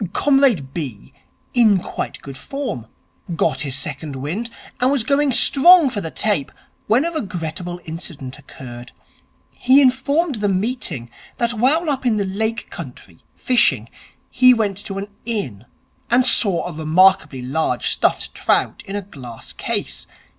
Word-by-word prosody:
Comrade 265 - +2
B. 135 -6 -6 0.4
in 225 -5 +5
quite 180 - -6
good 135 -1 -9
form. 230 - -5 0.5
Got - - 0
his 140 -3 -3
second 145 +1 -4
wind, 165 - -4 0.3
and 255 +2 +2
was 280 -5 +1
going 280 +3 +2
strong 295 +4 +6
for 205 - -3
the 165 - -5
tape, 200 -6 -1 0.4
when 245 +8 +3
a 340 - -1
regrettable 175 - -5
incident 160 -5 -7
occurred. 120 -3 -11 0.6
He 260 +3 +4
informed 275 0 +1
the 205 - +1
meeting, 185 - -3 0.3
that 235 0 0
while 275 +9 +1
up 275 -3 -1
in 235 -4 +1
the 200 - 0
Lake 220 +3 -3
country, 125 - -10 0.2
fishing, 130 - +1 0.4
he 255 0 +6
went 205 -4 -1
to 195 - -5
an 200 +1 -4 0.2
inn 165 - -4 0.4
and 245 +1 +3
saw 200 -8 +4
a 175 - -5
remarkably 160 -3 +3
large 130 -1 -1
stuffed - - 0
trout - - 0
in 195 - -5
a 205 - -3
glass 130 - -10
case. - - -3
195 Hz, 145 wpm, -20 LUFS, -, 0.6 s, strong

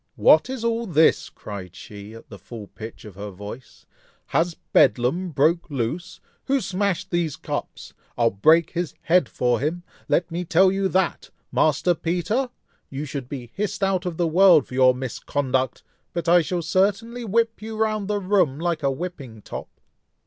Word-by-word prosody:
"What - - +5
is 260 -3 -4
all 230 0 0
this!" 160 -3 +3
cried 95 -4 -9
she, 105 +2 -10
at 115 - -13
the 100 - -11
full 110 +2 -9
pitch 110 +3 -10
of 105 - -10
her 100 +2 -7
voice, 105 +6 -10 0.4
"has 170 0 +1 0.2
bedlam 150 +10 +3
broke 160 +4 +1
loose! 140 +5 -3 0.3
who 275 +1 +2
smashed 195 -4 -2
these 170 -4 0
cups? - - -6 0.2
I'll 115 -1 +3
break 155 - +4
his 175 -4 -3
head 175 -4 +3
for 125 -2 0
him, 165 +5 -2 0.3
let 175 0 +1
me 175 +2 -2
tell 185 +3 +4
you 195 0 0
that! 190 -1 0 0.2
Master 155 +4 +2
Peter! 180 +10 -1 0.4
you 140 +2 -5
should 140 -3 -6
be 125 -4 -7
hissed 205 0 -3
out 190 -1 +1
of 170 -2 -4
the 175 - +1
world 170 -3 +6
for - - -12
your 130 0 +5
misconduct; 130 0 -2 0.3
but 170 -1 -3
I 175 +1 +6
shall 170 +1 -2
certainly 210 +7 0
whip 225 +1 0
you 220 0 -6
round 215 -2 0
the 210 0 0
room 185 -8 +1
like 170 -2 -1
a 140 - +2
whipping 135 - -6
top." - - -7
170 Hz, 170 wpm, -23 LUFS, 130-190 Hz, 0.4 s, world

